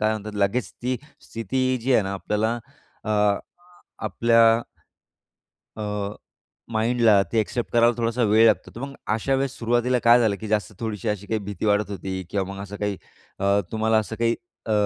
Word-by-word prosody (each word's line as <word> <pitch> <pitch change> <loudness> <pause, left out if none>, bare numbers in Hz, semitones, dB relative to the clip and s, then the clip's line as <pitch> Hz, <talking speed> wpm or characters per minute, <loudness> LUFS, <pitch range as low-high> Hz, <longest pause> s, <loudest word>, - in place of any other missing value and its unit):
काय 110 0 +2
म्हणतात 105 0 -5
लगेच 105 +2 0
ती 125 +1 0 0.2
स्थिती 120 +4 -2 0.2
जी 130 +2 +1
आहे 110 - +5
ना, 95 0 -3
आपल्याला 105 +3 -1 0.5
अ, 110 - -3
अ, 105 -1 +3 0.7
आपल्या 115 0 +4 1.3
अ, 105 -1 -3 0.6
माईंड 115 +2 +1
ला 105 -4 +6
ते 115 - +2
एक्सेप्ट 115 +2 -2
करायला 120 0 +5
थोडासा 115 +1 0
वेळ 110 +1 +5
लागतो. - - +2
तर 115 - -7
मग 140 0 -5 0.2
अशा 115 +5 0
वेळेस 135 0 -2
सुरुवातीला 120 +2 +1
काय 120 +1 +7
झालं? 110 -4 +2
की 110 - -5
जास्त 105 0 -1
थोडीशी 110 -2 -3
अशी 105 -1 -3
काही 110 - 0
भीती 105 +1 -4
वाटत 105 0 +2
होती? 95 0 -4
किंवा 100 -2 -1
मग 100 - -7
असं 100 0 -8
काही 105 -2 -2 0.4
अ, 100 +1 +3
तुम्हाला 110 0 +2
असं 110 +1 -5
काही 115 0 +2 0.3
अ, - - -1
110 Hz, 180 wpm, -24 LUFS, 105-115 Hz, 1.3 s, काय